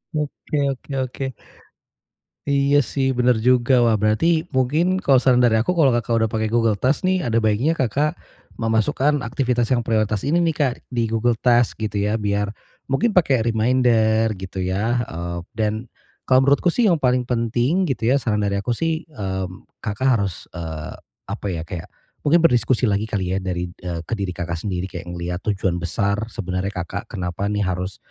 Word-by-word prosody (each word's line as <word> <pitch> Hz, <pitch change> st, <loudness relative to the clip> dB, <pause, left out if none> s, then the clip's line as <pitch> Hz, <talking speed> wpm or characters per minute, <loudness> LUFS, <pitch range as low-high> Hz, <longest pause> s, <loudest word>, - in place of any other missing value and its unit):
Oke 150 Hz, 0 st, -3 dB
oke 135 Hz, +2 st, -9 dB
oke. 130 Hz, +1 st, -5 dB, 1.2 s
Iya 140 Hz, +1 st, +4 dB
sih 135 Hz, +2 st, -1 dB
bener 125 Hz, -1 st, +3 dB
juga. 125 Hz, +1 st, +3 dB
Wah 115 Hz, -, +4 dB
berarti 160 Hz, +11 st, +2 dB
mungkin 150 Hz, +8 st, +1 dB
kalau 135 Hz, -8 st, +3 dB
saran 125 Hz, -1 st, +4 dB
dari 110 Hz, -2 st, +4 dB
aku 180 Hz, +10 st, -1 dB
kalau 140 Hz, -6 st, +5 dB
Kakak 115 Hz, -1 st, +1 dB
udah -, -, -3 dB
pakai 110 Hz, -1 st, -1 dB
Google 115 Hz, -1 st, +2 dB
Task 135 Hz, -, +1 dB
nih 185 Hz, 0 st, +2 dB
ada 115 Hz, -7 st, 0 dB
baiknya 115 Hz, +9 st, +1 dB
Kakak 140 Hz, +5 st, 0 dB, 0.4 s
memasukkan 115 Hz, +6 st, +1 dB
aktivitas 120 Hz, -1 st, 0 dB
yang 120 Hz, -3 st, +1 dB
prioritas 110 Hz, -2 st, +1 dB
ini 170 Hz, +4 st, +3 dB
nih, 165 Hz, -2 st, +1 dB
Kak, 135 Hz, -4 st, +2 dB, 0.2 s
di 120 Hz, -2 st, 0 dB
Google 115 Hz, +1 st, +1 dB
Task 120 Hz, -1 st, +2 dB
gitu 105 Hz, -1 st, -1 dB
ya 105 Hz, +2 st, +1 dB
biar 105 Hz, -1 st, -1 dB, 0.4 s
mungkin 205 Hz, -, +1 dB
pakai 135 Hz, -10 st, +3 dB
reminder 115 Hz, -1 st, +3 dB
gitu 95 Hz, 0 st, -7 dB
ya, 105 Hz, +7 st, 0 dB
eee, 85 Hz, +1 st, -5 dB, 0.2 s
dan 105 Hz, -1 st, 0 dB, 0.5 s
kalau 130 Hz, 0 st, +5 dB
menurutku 140 Hz, +5 st, +3 dB
sih 235 Hz, +7 st, +2 dB
yang 170 Hz, -3 st, +2 dB
paling 125 Hz, -2 st, +2 dB
penting 125 Hz, +9 st, 0 dB
gitu 125 Hz, -3 st, 0 dB
ya, 140 Hz, -, +4 dB
saran 105 Hz, -3 st, 0 dB
dari 100 Hz, 0 st, 0 dB
aku 120 Hz, +4 st, -1 dB
sih, 165 Hz, +4 st, -2 dB
eee, 95 Hz, -, -4 dB, 0.4 s
Kakak 110 Hz, +3 st, -3 dB
harus, 95 Hz, -4 st, -3 dB
eee, 80 Hz, -3 st, -6 dB, 0.4 s
apa -, -, -4 dB
ya, 85 Hz, -3 st, -3 dB
kayak 85 Hz, -1 st, -6 dB, 0.4 s
mungkin 165 Hz, +3 st, +5 dB
berdiskusi 125 Hz, -4 st, +3 dB
lagi 105 Hz, 0 st, 0 dB
kali 95 Hz, -4 st, -1 dB
ya 95 Hz, -, +1 dB
dari 90 Hz, -1 st, -3 dB
eee, 85 Hz, -2 st, -6 dB
ke 100 Hz, -, -5 dB
diri 95 Hz, -3 st, -3 dB
Kakak 85 Hz, -1 st, -3 dB
sendiri 90 Hz, 0 st, -3 dB
kayak 90 Hz, -2 st, -7 dB
ngelihat 90 Hz, 0 st, -4 dB
tujuan 95 Hz, -4 st, 0 dB
besar 100 Hz, +4 st, -1 dB
sebenarnya 90 Hz, -3 st, -3 dB
Kakak 90 Hz, +3 st, -5 dB
kenapa 90 Hz, 0 st, -3 dB
nih 105 Hz, 0 st, 0 dB
harus 95 Hz, +1 st, -3 dB
115 Hz, 175 wpm, -22 LUFS, 100-130 Hz, 1.2 s, kalau